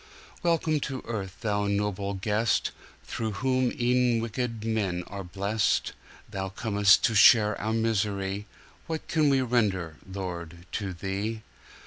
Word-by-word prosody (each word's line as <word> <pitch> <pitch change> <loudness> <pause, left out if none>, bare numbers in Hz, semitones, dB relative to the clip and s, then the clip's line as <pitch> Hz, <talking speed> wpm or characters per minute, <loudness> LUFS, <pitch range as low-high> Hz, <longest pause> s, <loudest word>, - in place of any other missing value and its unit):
Welcome 165 -2 +1
to 135 -2 -4
earth, 100 -5 -5
Thou 105 -2 0
noble 100 -1 -1
guest, 105 +4 +1 0.3
Through 110 -2 -3
whom 130 +4 +1
e'en 125 -1 +3
wicked 115 -1 -3
men 100 -6 -1
are 100 -1 -7
blest! 100 +4 0 0.3
Thou 95 0 -4
com'st 100 0 +3
to 115 - +3
share 105 0 +7
our 110 - -1
misery, 105 -3 -1 0.4
What 160 -1 -4
can 155 -2 +3
we 135 -1 +3
render, 100 -10 0
Lord, 85 -3 -6
to 100 -3 -3
Thee! 100 +5 -3
105 Hz, 130 wpm, -27 LUFS, 95-115 Hz, 0.4 s, share